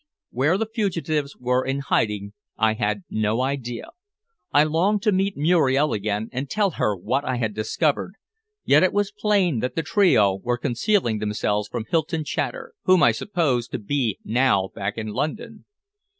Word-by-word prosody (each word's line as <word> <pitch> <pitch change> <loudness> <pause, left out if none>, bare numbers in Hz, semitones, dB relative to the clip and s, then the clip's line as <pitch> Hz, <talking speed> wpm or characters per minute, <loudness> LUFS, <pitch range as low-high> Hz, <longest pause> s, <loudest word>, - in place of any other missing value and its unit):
Where 145 +9 +2
the 225 - 0
fugitives 165 - -2
were 125 +1 0
in 135 +1 -2
hiding 105 -6 -1 0.2
I 110 0 +3
had 105 -2 -2
no 110 +2 0
idea. 130 -3 -4 0.6
I 145 - +5
longed 185 +7 +1
to 215 - +3
meet 195 +1 0
Muriel 150 -2 +3
again 105 +1 -2
and 130 +2 -4
tell 205 -3 +1
her 105 -9 -1
what 130 +10 -1
I 130 - -1
had 110 -3 -2
discovered, 150 - -1 0.5
yet 145 +2 +5
it 185 - +3
was 205 0 0
plain 200 - +1
that 125 - -3
the 165 - -1
trio 110 - +3
were 120 +2 -1
concealing 120 - 0
themselves 105 0 -1
from 115 -1 -5
Hylton 165 0 0
Chater, 465 - -4
whom 185 -2 +5
I 120 - +6
supposed 130 - -1
to - - 0
be 115 -1 -1
now 110 -5 +2
back 100 +2 -4
in 110 -1 -4
London. 215 - -4
135 Hz, 165 wpm, -23 LUFS, 110-175 Hz, 0.6 s, I